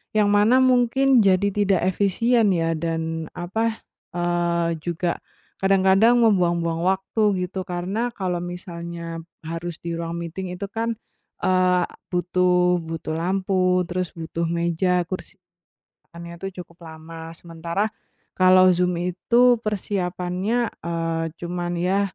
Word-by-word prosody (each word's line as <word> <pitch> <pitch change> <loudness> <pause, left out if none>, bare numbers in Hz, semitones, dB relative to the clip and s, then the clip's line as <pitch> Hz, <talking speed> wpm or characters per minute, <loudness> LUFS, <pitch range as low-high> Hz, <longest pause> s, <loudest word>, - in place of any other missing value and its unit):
yang 210 -1 +4
mana 210 +5 +5
mungkin 255 +1 +4
jadi 195 +1 +3
tidak 200 -3 +2
efisien 220 +2 +2
ya, 165 -1 +1
dan, 165 0 -3
apa, 220 +6 -2 0.3
eee, 170 -1 0
juga 170 +1 -2 0.4
kadang-kadang 195 +5 +4
membuang-buang 170 -6 +2
waktu 190 +3 0 0.2
gitu, 190 +1 -5
karena 185 +7 -2
kalau 180 -3 -2
misalnya 170 -2 -6 0.2
harus 165 +1 -5
di 170 0 -3
ruang 165 0 -4
meeting 175 +2 -5
itu 200 +2 -5
kan, 230 +1 -2 0.5
eee, 185 -1 +3 0.3
butuh 180 0 +2
butuh 160 -1 -5
lampu, 185 +1 +1
terus 180 0 -3
butuh 165 0 -3
meja, 170 +2 +1
kursi 185 +2 -6 0.8
kan 170 0 -10
ya 170 - -8
tuh 195 +1 -5
cukup 175 -2 -11
lama, 160 +1 -9
sementara 170 +5 -3 0.5
kalau 185 0 +6
Zoom 180 0 +1
itu 240 +7 +3
persiapannya, 195 +2 -1 0.2
eee, 165 -1 -1
cuman 175 0 -4
ya 185 +3 +1
180 Hz, 120 wpm, -23 LUFS, 170-195 Hz, 0.8 s, kalau